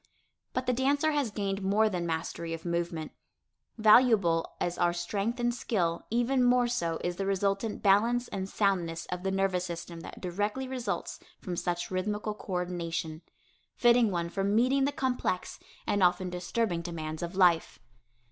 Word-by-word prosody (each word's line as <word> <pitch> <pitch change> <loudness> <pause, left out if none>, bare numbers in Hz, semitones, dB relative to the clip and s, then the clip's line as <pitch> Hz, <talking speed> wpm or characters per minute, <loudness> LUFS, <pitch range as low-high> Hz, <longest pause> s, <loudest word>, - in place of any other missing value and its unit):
But 255 0 -1
the 250 - +2
dancer 285 +5 +2
has 290 -5 0
gained 200 -1 -2
more 205 +3 +3
than 180 -4 -2
mastery 165 0 -3
of 165 - -12
movement. 170 -2 -2 0.7
Valuable 215 -7 +4
as 175 0 -1
are 175 0 +3
strength 200 +7 -2
and 240 0 +1
skill, 175 -8 -1
even 245 +3 +2
more 245 0 +4
so 170 -9 -1
is 175 0 -2
the 195 - -2
resultant 195 +2 -1
balance 230 +5 +3
and 190 0 -4
soundness 175 -6 0
of 180 0 -3
the 190 - -1
nervous 190 -2 +1
system 170 -1 -6
that - - -9
directly 205 +8 -2
results 250 -6 -3 0.2
from 180 - -5
such 175 +1 -2
rhythmical 210 +3 -2
coördination, 175 -5 -3 0.5
fitting 240 -2 +5
one 170 -3 -2
for 195 +3 -2
meeting 250 +7 +3
the 285 - +1
complex 250 -9 -2 0.3
and 205 - 0
often 180 0 +2
disturbing 180 +1 -1
demands 160 -2 -5
of 175 +1 -4
life. 175 -4 +3
195 Hz, 155 wpm, -29 LUFS, 175-230 Hz, 0.7 s, fitting